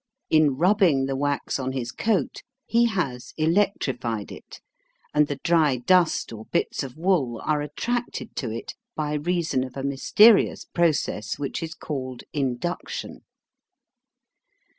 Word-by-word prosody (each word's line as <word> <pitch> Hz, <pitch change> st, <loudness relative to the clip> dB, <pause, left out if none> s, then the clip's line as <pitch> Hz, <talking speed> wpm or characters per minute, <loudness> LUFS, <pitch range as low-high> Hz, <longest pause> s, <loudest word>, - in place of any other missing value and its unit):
In 155 Hz, -4 st, +4 dB
rubbing 175 Hz, -6 st, +3 dB
the 135 Hz, 0 st, -2 dB
wax 145 Hz, 0 st, -1 dB
on 130 Hz, 0 st, -2 dB
his 125 Hz, -2 st, -3 dB
coat 205 Hz, -, -1 dB, 0.2 s
he 235 Hz, +1 st, +3 dB
has 140 Hz, -, -3 dB
electrified 155 Hz, -, 0 dB
it, -, -, -11 dB, 0.5 s
and 150 Hz, 0 st, +4 dB
the 145 Hz, -, -2 dB
dry 160 Hz, -6 st, +3 dB
dust 170 Hz, +2 st, +2 dB
or 110 Hz, 0 st, -9 dB
bits -, -, -1 dB
of 135 Hz, -1 st, -7 dB
wool 160 Hz, -10 st, +1 dB
are 150 Hz, -1 st, +1 dB
attracted 235 Hz, -, -3 dB
to 125 Hz, -, -2 dB
it 115 Hz, +1 st, -6 dB, 0.2 s
by 150 Hz, -1 st, -2 dB
reason 160 Hz, -3 st, 0 dB
of 130 Hz, 0 st, -8 dB
a 135 Hz, -, -4 dB
mysterious 195 Hz, -, +4 dB
process 155 Hz, -, 0 dB
which 140 Hz, -1 st, -4 dB
is 165 Hz, 0 st, -5 dB
called 130 Hz, -4 st, -5 dB
"induction." 140 Hz, +4 st, -3 dB
150 Hz, 135 wpm, -25 LUFS, 130-175 Hz, 0.5 s, In